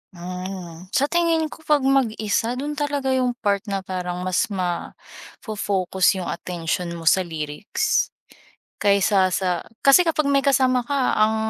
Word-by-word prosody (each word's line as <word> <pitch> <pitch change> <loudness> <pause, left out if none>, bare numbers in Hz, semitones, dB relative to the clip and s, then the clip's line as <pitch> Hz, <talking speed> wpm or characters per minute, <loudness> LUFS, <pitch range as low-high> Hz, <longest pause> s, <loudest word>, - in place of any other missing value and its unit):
Mm. 180 -1 -7
Sa 270 - +3
tingin 330 -2 +1
ko, - - -11
'pag 295 -3 +3
mag-isa, 235 -3 +1
do'n 290 +3 -4
talaga 285 -2 -1
'yung 250 -2 +1
part 200 -2 +2
na 195 -1 -2
parang 180 -1 -4
mas 185 +7 +1
mafo-focus 190 +1 -2
'yung 185 -2 -4
atensyon 170 0 -3
mo 165 - -8
sa 165 +4 +5
lyrics. 160 - -1 0.7
Kaysa 200 -2 +3
sa 180 -1 -1 0.2
kasi 275 +6 +6
kapag 310 -3 +1
may 275 -1 +2
kasama 255 -3 +3
ka, 275 -1 0
ang 215 +1 +3
205 Hz, 140 wpm, -22 LUFS, 180-270 Hz, 0.7 s, kasi